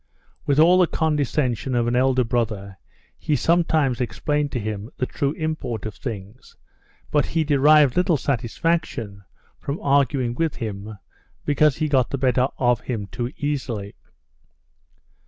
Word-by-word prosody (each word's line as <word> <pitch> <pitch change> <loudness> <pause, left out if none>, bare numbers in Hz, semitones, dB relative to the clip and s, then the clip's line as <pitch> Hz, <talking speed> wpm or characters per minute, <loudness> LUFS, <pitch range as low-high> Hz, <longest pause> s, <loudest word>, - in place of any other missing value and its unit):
With 140 - +2
all 175 +3 +6
the 180 - +5
condescension 140 -6 0
of 120 -1 +2
an 120 +1 0
elder 130 0 +3
brother 110 -5 -2 0.4
he 150 - 0
sometimes 155 -4 +2
explained 145 +4 -1
to 125 - -1
him 105 0 -5
the 125 - 0
true 140 +2 -2
import 145 -10 -4
of 110 - -4
things, 105 -1 -8 0.6
but 150 - +2
he 165 -1 0
derived 145 -1 +5
little 180 -3 +3
satisfaction 120 -4 -2 0.4
from 140 +3 -4
arguing 135 -3 +1
with 160 +4 -1
him 105 -1 -6 0.5
because 145 -1 +3
he 155 - 0
got 130 -4 +2
the 140 - -2
better 130 -1 +2
of 125 -2 +2
him 110 -5 -4
too 120 0 -3
easily. 125 -9 -3
130 Hz, 140 wpm, -23 LUFS, 115-150 Hz, 0.6 s, all